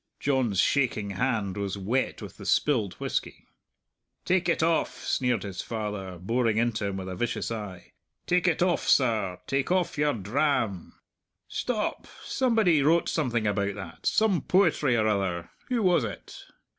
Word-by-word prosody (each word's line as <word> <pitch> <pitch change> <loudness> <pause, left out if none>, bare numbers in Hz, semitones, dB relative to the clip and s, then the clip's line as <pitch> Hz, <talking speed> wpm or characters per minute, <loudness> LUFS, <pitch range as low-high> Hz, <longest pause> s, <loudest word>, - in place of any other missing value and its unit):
John's 130 -9 +1
shaking 110 -7 +1
hand 105 -3 -1
was 100 -1 -3
wet 115 +7 -1
with - - -10
the - - -10
spilled 115 -10 +2
whisky. - - -4 0.8
"Take 180 -1 +2
it 165 - +2
off," 165 0 0
sneered 125 -5 0
his 100 -3 -5
father, 105 -5 -5
boring 115 +4 0
into 115 -3 0
him 95 -1 -3
with 95 -1 -5
a 95 - -5
vicious 120 +4 -2
eye; 105 -5 -7 0.3
"take 180 0 +2
it 175 0 +2
off, 180 -2 0
serr; 110 -8 +2
take 135 +4 -1
off 180 -5 +1
your 145 0 +2
dram! 115 - -1 0.5
Stop! - - -2 0.2
Somebody 220 - +2
wrote 165 +4 +3
something 120 -8 0
about 100 -1 0
that 95 -5 -7
some 215 -5 +3
poetry 160 -9 +3
or 110 - +2
other. 95 -5 -1 0.2
Who 240 -3 0
was 180 -7 +4
it?" 105 - -8
115 Hz, 155 wpm, -27 LUFS, 100-150 Hz, 0.8 s, was